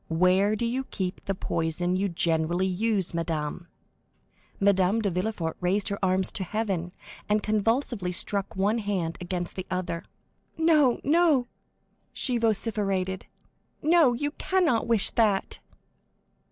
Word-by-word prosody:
—where 185 Hz, +5 st, +3 dB
do 235 Hz, -, -2 dB
you 250 Hz, +3 st, -1 dB
keep 185 Hz, -6 st, -4 dB
the 195 Hz, -1 st, -1 dB
poison 170 Hz, +1 st, -1 dB
you 195 Hz, +1 st, 0 dB
generally 170 Hz, +1 st, 0 dB
use, 190 Hz, 0 st, 0 dB
madame?" 165 Hz, 0 st, -3 dB, 0.9 s
Madame 195 Hz, +1 st, +3 dB
de 205 Hz, -3 st, 0 dB
Villefort 180 Hz, -3 st, -2 dB
raised 190 Hz, +3 st, +1 dB
her 200 Hz, -, -3 dB
arms 185 Hz, 0 st, +2 dB
to 190 Hz, -, -2 dB
heaven, 190 Hz, -3 st, -2 dB, 0.4 s
and 210 Hz, 0 st, +2 dB
convulsively 215 Hz, -2 st, 0 dB
struck 200 Hz, +2 st, -2 dB
one 205 Hz, +4 st, +1 dB
hand 190 Hz, -6 st, -2 dB
against 175 Hz, 0 st, -3 dB
the 185 Hz, -, -6 dB
other. 175 Hz, -2 st, -3 dB, 0.5 s
"No, 310 Hz, -6 st, +4 dB
no," 295 Hz, -5 st, +3 dB, 0.6 s
she 250 Hz, -3 st, 0 dB
vociferated, 200 Hz, -4 st, -1 dB, 0.6 s
"no, 315 Hz, -5 st, +5 dB
you 290 Hz, +5 st, -2 dB
cannot 325 Hz, -9 st, +1 dB
wish 230 Hz, -4 st, +4 dB
that!" 210 Hz, -4 st, +1 dB
195 Hz, 125 wpm, -26 LUFS, 180-230 Hz, 0.9 s, no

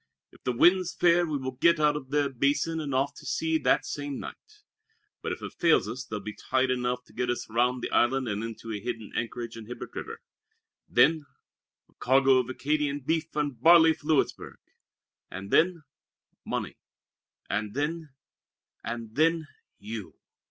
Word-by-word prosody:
If -, -, -21 dB
the 125 Hz, -, 0 dB
wind's 175 Hz, +8 st, +4 dB
fair 175 Hz, 0 st, +4 dB
we 150 Hz, -2 st, -1 dB
will 130 Hz, -1 st, -4 dB
get 170 Hz, +4 st, +4 dB
out 150 Hz, -1 st, +3 dB
of 135 Hz, -3 st, -6 dB
the 145 Hz, 0 st, +2 dB
Basin 140 Hz, +5 st, 0 dB
and 150 Hz, -3 st, -4 dB
off 135 Hz, +2 st, +1 dB
to -, -, -12 dB
sea 160 Hz, 0 st, 0 dB
that -, -, +2 dB
same 145 Hz, -1 st, -4 dB
night; 420 Hz, -1 st, -11 dB, 0.6 s
but -, -, -3 dB
if -, -, -6 dB
it -, -, -6 dB
fails 165 Hz, -, +3 dB
us 125 Hz, +4 st, -5 dB
there'll 105 Hz, -4 st, -6 dB
be 110 Hz, -, -5 dB
tide 130 Hz, 0 st, 0 dB
enough 125 Hz, 0 st, -1 dB
to -, -, -22 dB
get 125 Hz, -, -2 dB
us 120 Hz, -, -2 dB
round 125 Hz, +2 st, +1 dB
the -, -, -2 dB
Island 130 Hz, +1 st, +2 dB
and 105 Hz, 0 st, -2 dB
into 115 Hz, 0 st, -7 dB
a 105 Hz, -, -3 dB
hidden 115 Hz, -1 st, -5 dB
anchorage 115 Hz, -1 st, -4 dB
in 115 Hz, -2 st, -9 dB
Hibert 125 Hz, 0 st, -8 dB
River. -, -, -6 dB, 0.7 s
Then 145 Hz, +4 st, +4 dB, 0.6 s
a -, -, -30 dB
cargo 135 Hz, 0 st, +4 dB
of 125 Hz, 0 st, -2 dB
Acadian 145 Hz, +2 st, -1 dB
beef 160 Hz, +3 st, -2 dB
and 145 Hz, -6 st, -2 dB
barley 165 Hz, +1 st, +7 dB
for 150 Hz, -1 st, -14 dB
Louisburg! 155 Hz, -3 st, 0 dB, 0.7 s
And 95 Hz, +1 st, -8 dB
then 170 Hz, -1 st, +3 dB, 0.6 s
money! -, -, -4 dB, 0.7 s
And 105 Hz, +2 st, -3 dB
then 155 Hz, +2 st, -2 dB, 0.7 s
and 115 Hz, -2 st, -5 dB
then 160 Hz, 0 st, +2 dB, 0.3 s
you!" 105 Hz, -1 st, -7 dB
135 Hz, 175 wpm, -28 LUFS, 120-155 Hz, 0.7 s, barley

